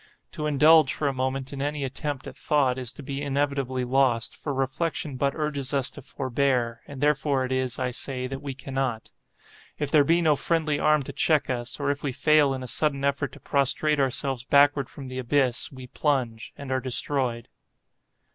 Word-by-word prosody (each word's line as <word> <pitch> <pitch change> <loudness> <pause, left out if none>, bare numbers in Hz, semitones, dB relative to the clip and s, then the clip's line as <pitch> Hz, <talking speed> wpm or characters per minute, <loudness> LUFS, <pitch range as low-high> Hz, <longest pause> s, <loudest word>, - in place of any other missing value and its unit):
To 150 - -3
indulge, 150 0 +6
for 150 - -1
a 140 - 0
moment, 130 +1 -2
in 135 - -5
any 145 0 -2
attempt 135 +1 -3
at - - -8
thought, 135 -4 +1
is 125 -2 -3
to 145 - -11
be 140 0 -4
inevitably 140 -2 -1
lost; 125 -2 +1
for 145 - -5
reflection 135 +2 -2
but 140 +2 0
urges 145 -3 -1
us 135 -2 0
to 145 - -10
forbear, 125 -2 -1
and 140 -2 -9
therefore 145 -2 +2
it 130 - -6
is, 130 -1 -1
I 125 -1 -1
say, 130 +1 -3
that 135 +1 -5
we 140 -3 -5
cannot. 135 -4 -3 0.7
If 145 -2 -3
there 150 -2 +6
be 165 +4 +3
no 155 -3 +3
friendly 155 +1 0
arm 150 -2 +3
to - - -8
check 155 -4 +2
us, 120 +3 -3
or 140 0 +1
if 145 - -4
we 140 - -2
fail 145 +1 +4
in 130 - -6
a - - -6
sudden 140 +1 0
effort 140 -2 0
to - - -12
prostrate 145 +2 +1
ourselves 135 -1 0
backward 140 0 +4
from 135 -2 -9
the 130 0 -5
abyss, 130 -1 +1
we 130 -2 -10
plunge, 125 -4 -1
and 140 -2 -7
are 130 0 0
destroyed. 125 -2 0
135 Hz, 195 wpm, -26 LUFS, 130-145 Hz, 0.7 s, indulge